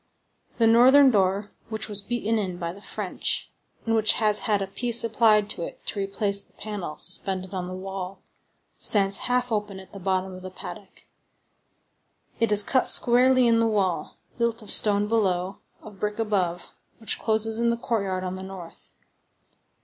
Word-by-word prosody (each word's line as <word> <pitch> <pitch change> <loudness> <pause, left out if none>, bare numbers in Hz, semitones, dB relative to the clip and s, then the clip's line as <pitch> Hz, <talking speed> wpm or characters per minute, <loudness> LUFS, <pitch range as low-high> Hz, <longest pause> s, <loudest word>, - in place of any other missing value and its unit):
The 230 - +3
northern 260 +4 +6
door, 195 0 0 0.2
which 220 -1 -3
was 205 -2 -3
beaten 225 0 -2
in 185 -4 -4
by 170 -1 -5
the 200 - -14
French, - - -3 0.3
and 225 - 0
which 220 -1 +3
has 210 -2 +4
had 205 -1 +2
a 195 - -2
piece 235 +4 0
applied 220 -2 +3
to - - -7
it - - -8
to 205 - -3
replace 200 0 -1
the - - -17
panel 205 -7 -7
suspended 185 +1 -1
on 180 -1 -4
the 185 - -7
wall, 190 0 -7 0.5
stands 195 -2 +4
half 250 0 0
open 205 -3 -3
at 190 0 -15
the 200 - -9
bottom 190 0 -2
of 185 - -10
the 185 - -8
paddock; 185 - -11 1.3
it 230 -2 +1
is 210 0 +5
cut 260 +3 +2
squarely 255 +1 +5
in 230 -1 +3
the 230 - +2
wall, 190 -7 -2 0.2
built 235 -1 -1
of 210 - -6
stone 205 -1 +4
below, 195 -4 -1 0.2
of 205 -3 -13
brick 210 0 -3
above 190 -6 -2 0.2
which 225 - 0
closes 220 0 0
in 235 0 +1
the 235 - 0
courtyard 200 -7 -3
on 185 0 -4
the 190 - -8
north. 190 -3 -11
205 Hz, 175 wpm, -24 LUFS, 190-225 Hz, 1.3 s, northern